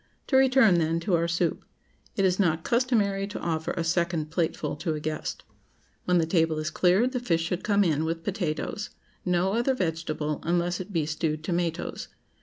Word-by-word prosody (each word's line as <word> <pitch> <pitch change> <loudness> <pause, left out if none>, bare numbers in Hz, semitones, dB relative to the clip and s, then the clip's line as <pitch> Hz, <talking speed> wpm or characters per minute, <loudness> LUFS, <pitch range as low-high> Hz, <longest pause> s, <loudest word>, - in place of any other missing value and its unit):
To 265 - 0
return, 260 -8 +5
then, 165 0 +1
to 180 +2 -1
our 170 0 +1
soup: 170 0 0 0.5
It 195 - +2
is 185 +1 +2
not 165 -4 +2
customary 215 -5 +1
to 205 - -6
offer 160 -1 -2
a 170 - 0
second 170 -2 0
plateful 165 -3 -1
to 160 0 -2
a - - -4
guest. 155 +1 -4 0.6
When 180 0 +3
the 165 - +3
table 165 -2 +1
is 155 +1 -2
cleared, 190 +8 +3
the 255 - -1
fish 165 -9 0
should 175 +1 -3
come 205 -1 +3
in, 155 -4 +1
with 165 +1 -3
potatoes—no 185 0 -2
other 240 +4 +1
vegetable, 160 - -2
unless 175 +1 0
it 185 +2 -7
be 165 -5 0
stewed 155 0 -2
tomatoes. 170 -1 -2
170 Hz, 180 wpm, -27 LUFS, 160-195 Hz, 0.6 s, return